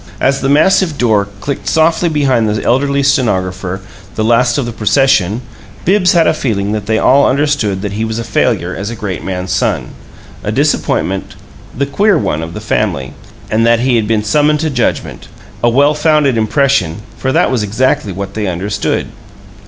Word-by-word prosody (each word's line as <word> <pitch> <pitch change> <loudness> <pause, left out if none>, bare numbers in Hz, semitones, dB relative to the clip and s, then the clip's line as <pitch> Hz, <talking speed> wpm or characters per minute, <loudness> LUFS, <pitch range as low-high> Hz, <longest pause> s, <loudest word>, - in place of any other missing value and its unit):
As 135 +1 +1
the 135 - 0
massive 160 +2 +3
door 110 -4 +2
clicked 140 +6 -4
softly 165 +2 +2
behind 135 -8 +1
the 105 0 -2
elderly 140 +3 +1
stenographer, 95 -8 0 0.3
the 110 - -1
last 120 +3 +2
of 140 - -1
the 120 - -4
procession, 110 -2 +1 0.4
Bibbs 185 0 +3
had 170 -2 +4
a - - +3
feeling 100 -5 -2
that 105 -1 -3
they 110 0 +1
all 140 +5 +4
understood 130 -8 0
that 100 - -3
he 105 +2 -3
was 110 0 -3
a 115 - -3
failure 95 -5 0
as 100 +2 -4
a 120 - -5
great 100 -5 -5
man's 90 -1 -4
son, - - -1 0.5
a - - -2
disappointment, 95 +1 -1 0.4
the 140 - +1
"queer 200 +7 +2
one" 80 - -1
of 80 +1 -7
the - - -4
family, 65 -1 -2 0.4
and 110 +1 +2
that 115 0 +3
he 125 0 +2
had 110 -2 +1
been 110 -1 +1
summoned 150 +7 +2
to 160 -1 -1
judgment 125 -4 -2 0.4
a 120 - +5
well 140 +5 +3
founded 150 -3 +2
impression, 110 - +1
for 130 - -1
that - - +2
was 125 -4 0
exactly 105 0 0
what 100 +2 -6
they 105 -2 -3
understood. 95 +4 -2
115 Hz, 185 wpm, -14 LUFS, 105-140 Hz, 0.5 s, a